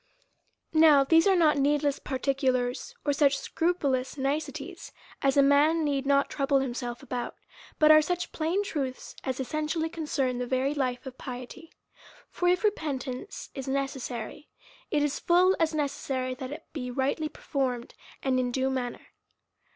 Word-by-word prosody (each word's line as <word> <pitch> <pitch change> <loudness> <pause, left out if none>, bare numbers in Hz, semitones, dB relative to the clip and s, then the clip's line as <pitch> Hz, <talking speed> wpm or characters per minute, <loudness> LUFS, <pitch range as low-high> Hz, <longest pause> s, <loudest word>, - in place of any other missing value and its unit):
Now 310 -3 +7
these 325 +5 +4
are 385 - +5
not 305 -5 +4
heedless 290 0 +1
particulars, 260 - -1
or 290 - +2
such 280 -1 +3
scrupulous 280 -6 -1
niceties, 295 +5 -3 0.3
as 275 0 +2
a 280 - +7
man 295 +4 +4
need 280 -2 -1
not 280 0 +4
trouble 275 0 +1
himself 245 -1 -3
about; 250 -3 -4 0.4
but 305 0 +6
are 310 0 +8
such 355 +3 -2
plain 335 +6 0
truths, 275 -9 -4
as 260 -1 -3
essentially 310 +4 -1
concern 280 -6 -1
the 250 - -2
very 260 +3 +1
life 255 -3 -2
of 260 -1 -9
piety. 255 +6 -8 0.6
For 355 - -1
if 360 +3 +3
repentance 290 - -3
is 270 -1 -6
necessary, 270 -1 -4 0.4
it 295 -1 +1
is 295 -1 -1
full 365 +2 +4
as 320 -1 +1
necessary 270 -3 -2
that 255 0 -6
it 310 +2 -7
might - - -45
be 255 -5 -4
rightly 275 +5 -1
performed, 255 -5 -3 0.3
and 260 -1 +2
in 250 -1 0
due 265 +1 0
manner. 250 -2 -4
280 Hz, 155 wpm, -28 LUFS, 260-310 Hz, 0.6 s, are